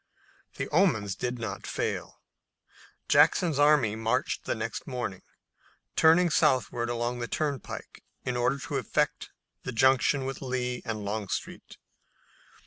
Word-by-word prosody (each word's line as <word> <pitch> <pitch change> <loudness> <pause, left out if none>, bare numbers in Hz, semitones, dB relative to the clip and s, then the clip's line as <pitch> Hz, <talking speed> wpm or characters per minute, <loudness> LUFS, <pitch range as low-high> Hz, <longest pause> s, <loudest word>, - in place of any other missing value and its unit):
The - - -3
omens 135 - +2
did 125 +5 -3
not 110 -4 -5
fail. - - -3 0.8
Jackson's 165 -6 +4
army 145 -8 +4
marched 115 +3 -1
the - - -1
next - - -5
morning, 120 -7 -4 0.7
turning 165 +2 +5
southward 125 -6 +2
along 120 +1 -2
the 120 - -3
turnpike 145 -2 -4 0.2
in 125 -1 -1
order 120 +3 +1
to 130 - -4
effect - - -1 0.3
the - - -5
junction 130 +2 +3
with 135 0 -5
Lee 125 -2 -2
and 110 -2 -4
Longstreet. 105 -1 -4
125 Hz, 125 wpm, -28 LUFS, 115-140 Hz, 0.8 s, turning